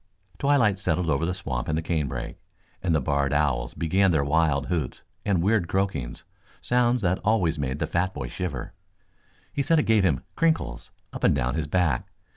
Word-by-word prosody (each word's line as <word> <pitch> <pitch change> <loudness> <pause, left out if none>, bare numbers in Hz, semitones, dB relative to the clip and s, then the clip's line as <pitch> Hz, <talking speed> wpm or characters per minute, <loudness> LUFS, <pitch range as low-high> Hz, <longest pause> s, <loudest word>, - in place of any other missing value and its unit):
Twilight 125 -9 +3
settled 90 -3 0
over 75 +4 +1
the 90 - -1
swamp 65 -8 -4
and 75 - 0
the 80 - -2
canebrake, 75 -8 -3 0.4
and 85 -3 +1
the - - +3
barred 70 +1 0
owls 70 -4 0
began 95 +4 +2
their 80 -5 +2
wild 70 -1 +2
hoots 80 -8 -3 0.2
and 95 -5 +1
weird 100 -3 +2
croakings, 95 -10 -2 0.4
sounds 125 -1 +2
that 90 0 +1
always 90 -8 +2
made 65 -1 -2
the - - -1
fat 90 +2 0
boy - - -5
shiver. 80 -9 -5 0.8
He 140 - 0
said 165 +4 +3
it 150 - +3
gave 110 -3 +3
him 75 -9 +1
"crinkles" 165 -1 0 0.2
up - - -7
and - - +4
down 60 +1 0
his 80 +1 -2
back. 80 -6 +1
85 Hz, 185 wpm, -26 LUFS, 70-100 Hz, 0.8 s, and